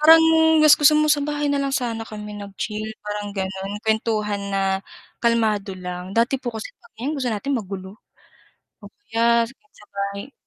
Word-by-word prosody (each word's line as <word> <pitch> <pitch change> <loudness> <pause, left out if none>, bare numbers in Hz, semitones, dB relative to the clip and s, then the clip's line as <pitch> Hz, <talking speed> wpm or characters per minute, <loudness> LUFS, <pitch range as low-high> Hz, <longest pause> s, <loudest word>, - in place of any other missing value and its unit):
Parang 320 +2 +9 0.4
gus 305 - +8
gusto 300 +1 +6
mo 305 0 +3
sa 290 - +1
bahay 295 0 -1
na 280 - +1
lang 275 0 -1
sana 235 -3 -2
kami 210 -1 -7
nag-chill 210 +2 -5
parang 210 0 -4
ganon 190 +1 -3
kuwentuhan 215 -2 0
na 195 0 0 0.6
kalmado 215 -4 +1
lang, 180 +1 -6
dati 245 +3 +2
po 255 - -4
kasi 220 - -7 0.4
gusto 265 -4 -2
natin 245 +7 -2
magulo, 195 -1 -6 0.9
oh, - - -8 0.2
kaya 235 +1 +4 0.3
sa 210 - -17
bahay. 200 +5 -4
215 Hz, 155 wpm, -22 LUFS, 200-255 Hz, 0.9 s, Parang